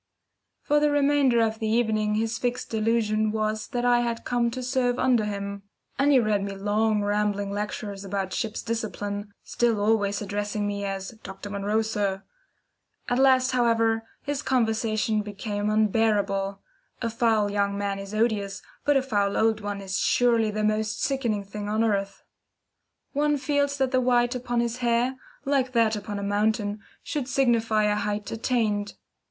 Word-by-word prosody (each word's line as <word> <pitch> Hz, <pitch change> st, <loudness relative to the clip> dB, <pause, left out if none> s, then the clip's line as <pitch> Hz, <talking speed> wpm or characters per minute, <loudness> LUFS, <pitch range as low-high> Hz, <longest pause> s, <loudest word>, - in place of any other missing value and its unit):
For 295 Hz, 0 st, +3 dB
the 295 Hz, 0 st, +3 dB
remainder 285 Hz, -4 st, +3 dB
of 220 Hz, 0 st, -1 dB
the 220 Hz, -, -1 dB
evening 215 Hz, -2 st, +1 dB
his 225 Hz, +1 st, -1 dB
fixed 245 Hz, 0 st, -2 dB
delusion 220 Hz, -1 st, +1 dB
was 215 Hz, 0 st, -1 dB
that 245 Hz, 0 st, -2 dB
I 245 Hz, 0 st, +4 dB
had 235 Hz, -1 st, -2 dB
come 240 Hz, -1 st, +1 dB
to 255 Hz, +2 st, -5 dB
serve 250 Hz, -1 st, +1 dB
under 250 Hz, -5 st, +3 dB
him; 200 Hz, -1 st, -4 dB, 0.4 s
and 280 Hz, +1 st, +4 dB
he 270 Hz, -, +6 dB
read 215 Hz, -3 st, +1 dB
me 200 Hz, 0 st, -4 dB
long 210 Hz, +2 st, +1 dB
rambling 205 Hz, -1 st, 0 dB
lectures 205 Hz, -1 st, -4 dB
about 195 Hz, -1 st, -3 dB
ship's 225 Hz, -2 st, -3 dB
discipline, 205 Hz, -3 st, -4 dB
still 235 Hz, -3 st, +1 dB
always 205 Hz, -1 st, +1 dB
addressing 205 Hz, 0 st, -2 dB
me 200 Hz, 0 st, -2 dB
as 195 Hz, -1 st, -4 dB
"Dr. 195 Hz, +1 st, -8 dB
Munro, 205 Hz, +2 st, 0 dB
sir." 200 Hz, -3 st, -2 dB, 0.9 s
At 245 Hz, -, +1 dB
last, 260 Hz, -1 st, +4 dB
however, 230 Hz, -2 st, +2 dB, 0.2 s
his 290 Hz, 0 st, -2 dB
conversation 220 Hz, -4 st, +1 dB
became 205 Hz, 0 st, -3 dB
unbearable 205 Hz, -2 st, +1 dB, 0.4 s
a 230 Hz, -, -1 dB
foul 220 Hz, -3 st, +2 dB
young 200 Hz, -1 st, 0 dB
man 200 Hz, -1 st, -2 dB
is 195 Hz, 0 st, -7 dB
odious, 215 Hz, -3 st, 0 dB, 0.2 s
but 290 Hz, -1 st, +4 dB
a 265 Hz, -, +1 dB
foul 205 Hz, -6 st, 0 dB
old 220 Hz, -1 st, +2 dB
one 205 Hz, -1 st, -4 dB
is 190 Hz, -1 st, -2 dB
surely 230 Hz, -3 st, +3 dB
the 215 Hz, 0 st, -2 dB
most 215 Hz, 0 st, 0 dB
sickening 235 Hz, -7 st, 0 dB
thing 205 Hz, +1 st, -6 dB
on 215 Hz, +2 st, +1 dB
earth. 200 Hz, -3 st, -1 dB, 0.9 s
One 295 Hz, +1 st, +2 dB
feels 285 Hz, 0 st, 0 dB
that 265 Hz, -2 st, +1 dB
the 255 Hz, -1 st, +3 dB
white 245 Hz, 0 st, +2 dB
upon 245 Hz, -1 st, -3 dB
the 235 Hz, -, +1 dB
hair, 240 Hz, +1 st, 0 dB, 0.3 s
like 270 Hz, -2 st, +1 dB
that 225 Hz, -2 st, +3 dB
upon 205 Hz, 0 st, -5 dB
the 200 Hz, -, -4 dB
mountain, 210 Hz, +1 st, 0 dB, 0.2 s
should 285 Hz, -4 st, -3 dB
signify 230 Hz, -5 st, +2 dB
a 210 Hz, 0 st, +2 dB
height 210 Hz, 0 st, -2 dB
attained. 220 Hz, -3 st, -1 dB
220 Hz, 165 wpm, -26 LUFS, 205-240 Hz, 0.9 s, he